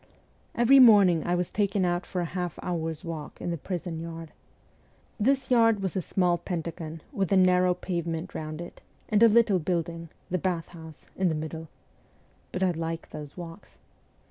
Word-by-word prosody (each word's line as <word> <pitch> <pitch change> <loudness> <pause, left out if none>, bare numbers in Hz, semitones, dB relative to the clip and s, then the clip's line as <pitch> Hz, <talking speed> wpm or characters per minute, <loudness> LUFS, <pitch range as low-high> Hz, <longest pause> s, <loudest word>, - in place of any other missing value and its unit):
Every 245 +4 +6
morning 200 -9 +7
I 175 - +2
was 180 -1 -2
taken 200 -2 +1
out 175 +1 -1
for 180 - -2
a - - -1
half 180 -3 -3
hour's 165 -2 -3
walk 160 -3 -7
in 175 - -3
the - - -1
prison 175 -1 -4
yard. 165 -1 -7 0.9
This 265 +4 +1
yard 225 -4 +4
was 190 - -2
a 190 - 0
small 175 0 +1
pentagon 165 -2 -5
with 195 -2 -2
a 195 - +5
narrow 180 -1 +4
pavement 170 -1 -4
round 155 +1 -5
it, 175 - -10 0.3
and 210 0 +2
a 230 - +9
little 220 -4 +4
building 170 0 -3 0.2
the 185 - 0
bath 175 -2 -2
house 160 -3 -12
in 185 -1 +1
the 160 - -1
middle. 160 +1 -5 0.8
But 185 - -2
I 185 - +3
liked 165 0 -5
those 150 +1 -9
walks. 175 +2 -10
175 Hz, 175 wpm, -27 LUFS, 165-190 Hz, 0.9 s, a